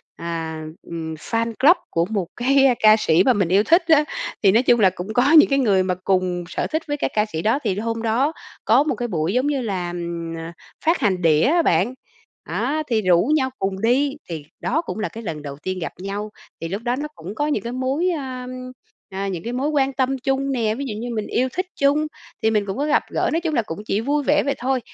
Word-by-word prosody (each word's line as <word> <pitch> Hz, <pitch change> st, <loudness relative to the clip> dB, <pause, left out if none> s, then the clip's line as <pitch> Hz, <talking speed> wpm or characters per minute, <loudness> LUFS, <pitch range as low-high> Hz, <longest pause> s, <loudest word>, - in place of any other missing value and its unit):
à, 165 Hz, -1 st, -4 dB, 0.2 s
ừm, 160 Hz, -1 st, -6 dB
fan 230 Hz, +8 st, -2 dB
club 315 Hz, +7 st, +6 dB
của 170 Hz, 0 st, +1 dB
một 195 Hz, -4 st, -2 dB
cái 270 Hz, +1 st, +4 dB
ca 215 Hz, -1 st, +7 dB
sĩ 170 Hz, -4 st, +3 dB
mà 255 Hz, -, +4 dB
mình 195 Hz, -4 st, +1 dB
yêu 195 Hz, +3 st, +4 dB
thích 335 Hz, +6 st, +4 dB
á, 310 Hz, -2 st, +6 dB, 0.4 s
thì 195 Hz, -, +6 dB
nói 230 Hz, +6 st, +4 dB
chung 240 Hz, -2 st, +4 dB
là 195 Hz, -3 st, +6 dB
cũng 195 Hz, +5 st, -5 dB
có 255 Hz, +5 st, +3 dB
những 315 Hz, -2 st, +8 dB
cái 275 Hz, -, +2 dB
người 200 Hz, -7 st, +3 dB
mà 185 Hz, -1 st, -1 dB
cùng 185 Hz, -2 st, 0 dB
sở -, -, -2 dB
thích 315 Hz, +1 st, -1 dB
với 290 Hz, 0 st, -2 dB
cái -, -, -1 dB
ca 210 Hz, 0 st, +2 dB
sĩ 160 Hz, -7 st, -4 dB
đó. 225 Hz, +6 st, +2 dB
Thì 200 Hz, -3 st, -1 dB
hôm 230 Hz, +1 st, -2 dB
đó 245 Hz, +7 st, +1 dB, 0.3 s
có 250 Hz, +6 st, +5 dB
một 305 Hz, -, -1 dB
cái 245 Hz, -, -3 dB
buổi 170 Hz, -2 st, -1 dB
giống 255 Hz, +3 st, +1 dB
như 280 Hz, -3 st, 0 dB
là, 185 Hz, -6 st, -2 dB
ừm, 170 Hz, -1 st, -5 dB
ờ, 165 Hz, 0 st, -6 dB, 0.3 s
phát 330 Hz, +2 st, +3 dB
hành 190 Hz, -4 st, +1 dB
đĩa 155 Hz, -3 st, +4 dB
á 335 Hz, +6 st, +4 dB
bạn, 185 Hz, -, +2 dB, 0.5 s
á, 310 Hz, +2 st, -2 dB
thì 225 Hz, -3 st, +1 dB
rủ 185 Hz, -, +3 dB
nhau 260 Hz, -3 st, +1 dB
cùng 195 Hz, 0 st, -2 dB
đi, 270 Hz, +5 st, +2 dB
thì 160 Hz, -4 st, -5 dB
đó 305 Hz, +7 st, 0 dB
cũng 320 Hz, -, -6 dB
là 215 Hz, -, -2 dB
cái 230 Hz, -, -9 dB
lần 155 Hz, -7 st, -5 dB
đầu 140 Hz, -1 st, -7 dB
tiên 185 Hz, +5 st, -4 dB
gặp 165 Hz, -, -4 dB
nhau. 200 Hz, +2 st, -4 dB, 0.3 s
Thì 165 Hz, -, -3 dB
lúc 195 Hz, +5 st, -4 dB
đó 245 Hz, 0 st, 0 dB
nó 290 Hz, +3 st, -4 dB
cũng 185 Hz, +6 st, -8 dB
có 295 Hz, +4 st, 0 dB
những 250 Hz, -10 st, -1 dB
cái 235 Hz, -, -4 dB
mối, 265 Hz, +8 st, 0 dB
ơ, 260 Hz, -6 st, -4 dB, 0.6 s
ờ, 195 Hz, +1 st, -3 dB
những 175 Hz, -3 st, -4 dB
cái 235 Hz, -, -4 dB
mối 275 Hz, +4 st, -1 dB
quan 275 Hz, -2 st, +1 dB
tâm 265 Hz, 0 st, 0 dB
chung 270 Hz, +1 st, -1 dB
nè, 225 Hz, -4 st, 0 dB
ví 280 Hz, -, -4 dB
dụ 240 Hz, -, -4 dB
như 240 Hz, +2 st, -5 dB
mình 215 Hz, -1 st, -3 dB
yêu 255 Hz, +2 st, +1 dB
thích 370 Hz, -, -1 dB
chung, 290 Hz, +2 st, +2 dB, 0.4 s
thì 220 Hz, -, +3 dB
mình 210 Hz, -2 st, +1 dB
cũng 195 Hz, +4 st, -4 dB
có 285 Hz, -, 0 dB
gặp 300 Hz, -, +2 dB
gỡ, -, -, 0 dB
nói 330 Hz, -, +1 dB
chung 325 Hz, -3 st, -2 dB
là 235 Hz, -, +2 dB
cũng 180 Hz, -3 st, -7 dB
chỉ 210 Hz, 0 st, 0 dB
vui 290 Hz, +4 st, 0 dB
vẻ 295 Hz, +2 st, +3 dB
vậy 280 Hz, -1 st, -1 dB
thôi, 260 Hz, +1 st, 0 dB
230 Hz, 255 wpm, -22 LUFS, 185-275 Hz, 0.6 s, những